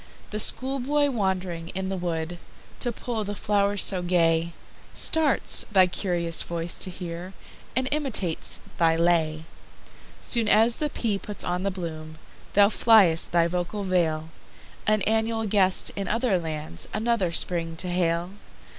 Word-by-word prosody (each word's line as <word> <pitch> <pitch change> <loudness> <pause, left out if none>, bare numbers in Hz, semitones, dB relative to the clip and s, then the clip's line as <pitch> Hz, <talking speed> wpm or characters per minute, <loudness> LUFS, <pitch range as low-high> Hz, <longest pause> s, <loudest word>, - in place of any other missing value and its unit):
The 210 - -3
schoolboy 275 +5 +2
wand'ring 185 -6 -2
in 190 0 -3
the 195 - -2
woodTo 175 +6 -5
pull 230 -3 -3
the 205 0 -5
flow'rs 205 -1 +1
so 185 -2 +3
gay, 170 -1 +1 0.4
Starts, 315 -4 +2
thy 190 -3 +6
curious 175 -2 -1
voice 170 0 -2
to - - -1
hear, 175 0 -7 0.4
And 260 +1 0
imitates 255 - 0 0.2
thy 165 -1 +4
lay. 165 -2 +1 0.7
Soon 230 -3 +1
as 225 +3 +4
the 300 - -1
pea 215 -7 -2
puts 205 0 -4
on 180 +1 -2
the 195 - 0
bloom, 160 -4 -7 0.4
Thou 200 0 +6
fly'st 210 -8 +4
thy 170 -1 +3
vocal 180 +4 -3
vale, 165 -4 0 0.6
An 215 -2 +2
annual 225 0 0
guest, 190 -3 +2
in 195 -2 -4
other 230 -3 +1
lands, 155 - -5
Another 215 -5 0
Spring 165 -1 -1
to 175 +3 -2
hail. 175 0 0
185 Hz, 140 wpm, -25 LUFS, 170-215 Hz, 0.7 s, thy